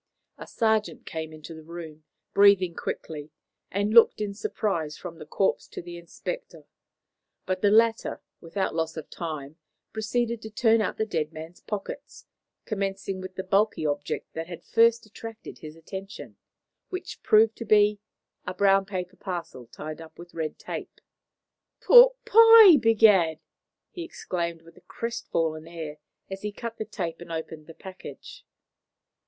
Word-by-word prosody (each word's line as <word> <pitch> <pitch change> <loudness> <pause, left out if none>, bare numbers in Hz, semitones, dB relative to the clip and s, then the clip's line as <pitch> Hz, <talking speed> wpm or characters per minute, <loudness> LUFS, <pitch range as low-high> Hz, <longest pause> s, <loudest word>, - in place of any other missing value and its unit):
A - - -9
sergeant 220 -2 0
came 160 -1 -5
into 155 +1 -10
the 160 - -10
room, 160 -1 -10 0.3
breathing 200 -3 +5
quickly, 150 -2 -6 0.4
and 205 +2 -1
looked 230 -1 +7
in 210 -1 -2
surprise 195 -6 -2
from 170 -2 -9
the 155 - -10
corpse 190 +5 0
to - - -8
the 175 0 -8
inspector. 170 - -7 0.8
But 185 0 -2
the 205 - +4
latter, 225 +2 +3 0.2
without 190 +4 -3
loss 160 0 -2
of 155 - -8
time, 155 -3 -6 0.4
proceeded 230 +1 -1
to 220 - -8
turn 225 0 +3
out - - -2
the 220 - 0
dead 160 -7 -2
man's 160 +2 -10
pockets, 210 -2 -7 0.4
commencing 195 -2 -3
with 185 0 -8
the 190 - -4
bulky 195 -2 +1
object 145 0 -3
that 165 0 -5
had 175 -1 -9
first 230 0 +3
attracted 225 +1 -10
his 155 0 -10
attention; 190 +4 -9 0.5
which 370 - -6
proved 220 +1 +4
to 230 - -6
be 210 -1 +4 0.5
a 180 - -4
brown 195 0 +3
paper 185 -1 -5
parcel 170 - -6
tied 155 +5 -8
up 160 - -13
with 175 0 -12
red 160 -2 -4
tape. - - -7 0.8
"Pork - - +8
pie, 450 -4 +9
begad!" 210 - +4 0.5
he 355 - -7
exclaimed 170 - -4
with 165 +2 -18
a - - -17
crestfallen 165 -7 -3
air 160 -3 -7 0.3
as 195 0 -7
he 210 - -3
cut 230 +2 -7
the 220 - -4
tape 170 -6 -5
and 175 - -9
opened 160 -1 -6
the 165 - -12
package. 190 -1 -11
190 Hz, 155 wpm, -26 LUFS, 165-215 Hz, 0.8 s, pie